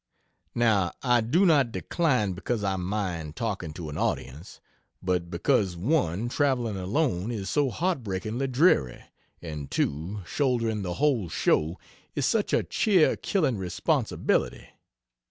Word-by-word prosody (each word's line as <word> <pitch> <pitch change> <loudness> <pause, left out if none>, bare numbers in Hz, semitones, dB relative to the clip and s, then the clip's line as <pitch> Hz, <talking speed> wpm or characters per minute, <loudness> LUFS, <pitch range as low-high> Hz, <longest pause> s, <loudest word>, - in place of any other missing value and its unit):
Now, 110 -7 +2
I 120 -2 +4
do 155 - +2
not 145 -8 +4
decline 125 - 0
because 105 +4 -3
I 95 -1 0
mind 90 -5 -3
talking 100 -8 -3
to 85 -1 -7
an 75 - -5
audience, 75 +9 -3 0.4
but 90 -2 0
because 95 0 +1
(1) 110 - 0
traveling 125 -6 0
alone 95 - -1
is 100 -5 -4
so 145 -2 +2
heartbreakingly 120 - -2
dreary, 125 - +2 0.4
and 75 -4 -6
(2) 85 +9 -2
shouldering 115 - 0
the 90 -2 -3
whole 130 - +1
show 80 +3 +1 0.4
is - - 0
such - - +1
a - - +2
cheer 195 -8 +3
killing 145 - 0
responsibility. 90 -2 -1
105 Hz, 130 wpm, -27 LUFS, 90-130 Hz, 0.4 s, I